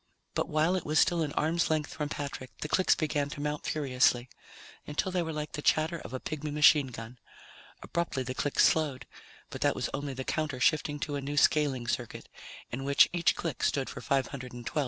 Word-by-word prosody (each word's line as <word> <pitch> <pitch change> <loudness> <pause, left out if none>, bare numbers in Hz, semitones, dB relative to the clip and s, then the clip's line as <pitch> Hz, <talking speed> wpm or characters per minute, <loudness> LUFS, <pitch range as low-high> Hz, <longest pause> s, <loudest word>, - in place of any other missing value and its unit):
But - - -1
while 155 +4 +2
it 185 - -2
was 155 +1 -1
still 170 +3 +4
an 150 -2 -1
arm's 165 +2 +1
length 155 -1 -1
from 150 -1 -3
Patrick, 140 -3 -5
the - - -2
clicks 185 +4 +3
began 150 -3 -1
to 145 - -7
mount 150 0 -3
furiously, 130 -4 +2 0.6
until 150 +5 -1
they 180 -1 +1
were 160 -1 -3
like 150 -1 -4
the 150 - -5
chatter 160 +3 +2
of - - -9
a 130 - -4
pigmy 155 +1 -4
machine 150 -1 +5
gun. 120 0 -9 0.6
Abruptly 170 -6 -2
the 130 0 -4
clicks 145 +2 +2
slowed, 150 -5 0 0.5
but - - -7
that - - +2
was - - -2
only 140 -1 -3
the 130 - -4
counter 155 -2 -2
shifting 150 +1 +2
to 145 -2 -2
a - - -4
new 145 +2 -4
scaling 140 -5 +3
circuit, 120 -1 -4 0.4
in 130 +3 -4
which 140 +1 +5
each 170 -1 +2
click 160 -7 -4
stood 135 -2 0
for - - -8
512 135 -1 -1
of 125 - -8
the 125 - -10
old - - -20
ones. - - +2
145 Hz, 220 wpm, -30 LUFS, 130-155 Hz, 0.6 s, machine